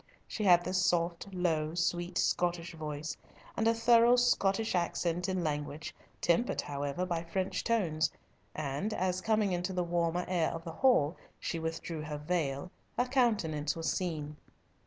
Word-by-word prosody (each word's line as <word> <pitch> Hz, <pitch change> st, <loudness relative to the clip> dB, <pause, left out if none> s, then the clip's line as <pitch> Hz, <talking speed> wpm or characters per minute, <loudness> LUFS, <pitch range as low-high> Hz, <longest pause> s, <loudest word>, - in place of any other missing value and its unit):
She 215 Hz, -, -4 dB
had 175 Hz, -2 st, +6 dB
the 185 Hz, -, -3 dB
soft, 175 Hz, 0 st, +1 dB
low, 165 Hz, -4 st, 0 dB
sweet 175 Hz, +1 st, -1 dB
Scottish 175 Hz, -1 st, 0 dB
voice, 155 Hz, -1 st, -5 dB, 0.4 s
and 225 Hz, -, +1 dB
a 230 Hz, -, +5 dB
thorough 235 Hz, +1 st, +6 dB
Scottish 225 Hz, -3 st, +2 dB
accent 175 Hz, 0 st, 0 dB
and 185 Hz, -2 st, -1 dB
language, 150 Hz, 0 st, -3 dB, 0.3 s
tempered, 175 Hz, +8 st, +2 dB
however, 145 Hz, +5 st, -3 dB
by 170 Hz, -2 st, -1 dB
French 185 Hz, +3 st, -2 dB
tones, 170 Hz, -9 st, +1 dB, 0.5 s
and 155 Hz, +9 st, -2 dB
as, 185 Hz, 0 st, 0 dB
coming 215 Hz, -1 st, +2 dB
into 180 Hz, +1 st, -1 dB
the 180 Hz, -1 st, 0 dB
warmer 175 Hz, 0 st, 0 dB
air 175 Hz, -3 st, +1 dB
of 165 Hz, 0 st, -6 dB
the 165 Hz, -, -6 dB
hall, 170 Hz, -, +3 dB, 0.2 s
she 165 Hz, -, -3 dB
withdrew 160 Hz, 0 st, -4 dB
her 150 Hz, -1 st, -4 dB
veil, 150 Hz, 0 st, -2 dB, 0.3 s
her 245 Hz, -, +3 dB
countenance 205 Hz, -, +1 dB
was 165 Hz, -1 st, -1 dB
seen. 155 Hz, -5 st, -3 dB
175 Hz, 155 wpm, -32 LUFS, 160-190 Hz, 0.5 s, had